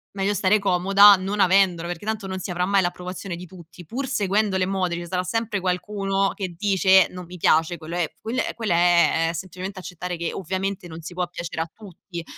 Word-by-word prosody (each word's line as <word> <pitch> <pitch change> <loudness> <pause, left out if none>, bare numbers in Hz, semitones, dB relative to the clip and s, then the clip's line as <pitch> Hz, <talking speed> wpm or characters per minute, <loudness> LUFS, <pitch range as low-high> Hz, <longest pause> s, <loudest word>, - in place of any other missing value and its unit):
meglio 195 +1 0
stare 205 +1 +3
comoda 195 +1 +6
non 195 +2 -2
avendola, 180 -3 +3
perché 175 +2 -6
tanto 220 -2 -3
non 190 0 -4
si 185 - -6
avrà 180 0 -1
mai 195 +1 +3
l'approvazione 180 +1 -4
di 175 +1 -9
tutti. 175 0 -14
Pur 260 - -4
seguendo 205 -4 0
le 185 -1 +1
mode, 185 -2 -1
ce 175 0 -6
sarà 180 +1 -1
sempre 225 +1 -2
qualcuno 195 +1 -1
che 185 -4 -5
dice: 190 -1 +4
"Non 180 0 -9
mi 180 +2 -11
piace" 165 0 +2
quello 165 +2 -6
è 175 -3 0
quel 235 +4 -3 0.2
quello 225 -4 -2
è 170 -1 +4
è - - -9
semplicemente 185 +3 -6
accettare 180 0 -6
che, 170 0 -3
ovviamente, 190 +1 -3
non 165 0 -9
si 165 - -8
può 180 0 -2
piacere 170 -2 -4
a 165 - -11
tutti. 185 -4 -10
185 Hz, 210 wpm, -23 LUFS, 175-195 Hz, 0.2 s, comoda